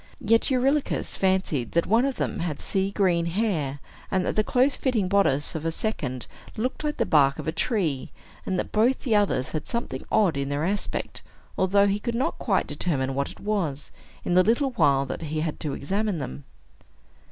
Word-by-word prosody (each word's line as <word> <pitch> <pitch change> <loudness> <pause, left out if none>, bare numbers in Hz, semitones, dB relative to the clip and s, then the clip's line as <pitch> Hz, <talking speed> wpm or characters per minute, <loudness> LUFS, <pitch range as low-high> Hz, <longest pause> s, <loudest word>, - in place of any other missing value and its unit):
Yet 225 +2 +2
Eurylochus 270 +3 +1
fancied 185 - 0
that 170 - +2
one 230 +5 +3
of 275 -2 -1
them - - -2
had 165 -4 -3
sea 195 0 0
green 180 -4 +1
hair, 170 -8 -1 0.3
and 185 -1 +1
that - - -1
the 215 - +3
close 260 +5 +2
fitting 230 -8 0
bodice 180 -8 +2
of 160 - -4
a 165 - 0
second 145 - -3 0.3
looked 255 +7 -2
like 300 0 -2
the - - +1
bark 140 -3 +4
of - - -6
a - - +1
tree, 165 - -1 0.3
and 185 - -1
that - - -3
both 235 +5 +2
the 230 -5 +1
others 200 -11 +1
had 155 - -4
something 235 0 -3
odd 195 -9 +3
in 140 0 -2
their 145 +2 -1
aspect, 200 +3 -3 0.3
although 200 +2 +3
he 200 +1 +1
could 235 +2 -3
not 270 +8 -1
quite 195 -5 +1
determine 145 -3 -1
what 140 +1 -1
it - - -13
was, 180 -9 -2 0.3
in - - 0
the 180 - +7
little 240 +7 +2
while 140 - +3
that 135 - -5
he 155 -1 -2
had 155 -1 -3
to 145 -3 -3
examine 200 +6 -1
them. 70 - -6
190 Hz, 200 wpm, -25 LUFS, 150-220 Hz, 0.3 s, the